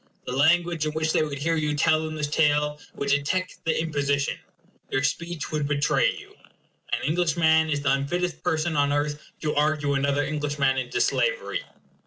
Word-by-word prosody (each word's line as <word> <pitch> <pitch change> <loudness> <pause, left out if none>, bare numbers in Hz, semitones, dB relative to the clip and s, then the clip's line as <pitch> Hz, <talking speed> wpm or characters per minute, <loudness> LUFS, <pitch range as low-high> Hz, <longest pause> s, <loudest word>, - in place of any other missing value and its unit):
The - - -4
language 160 +3 +2
in 155 - -3
which 160 0 0
they - - +3
would 150 -2 -2
hear 165 +4 0
you 150 -2 0
tell 155 +1 +3
them 155 0 -4
this 150 -1 -1
tale 150 0 +1 0.2
would 140 - -3
detect 145 +7 -1
the 165 - +1
imposition; 145 -3 0 0.5
your 135 - 0
speech 170 +3 -2
would 150 -2 -1
betray 150 - +2
you. 405 -1 -13 0.6
An - - -1
Englishman 160 -1 +2
is 145 -1 0
the 145 - +1
unfittest 165 +6 -1
person 160 +1 0
on 145 0 +2
earth 145 +1 -1 0.2
to 150 -1 -1
argue 150 -1 +1
another 140 +1 +1
Englishman 145 -3 0
into 125 -1 -3
slavery. - - 0
150 Hz, 175 wpm, -25 LUFS, 145-160 Hz, 0.6 s, they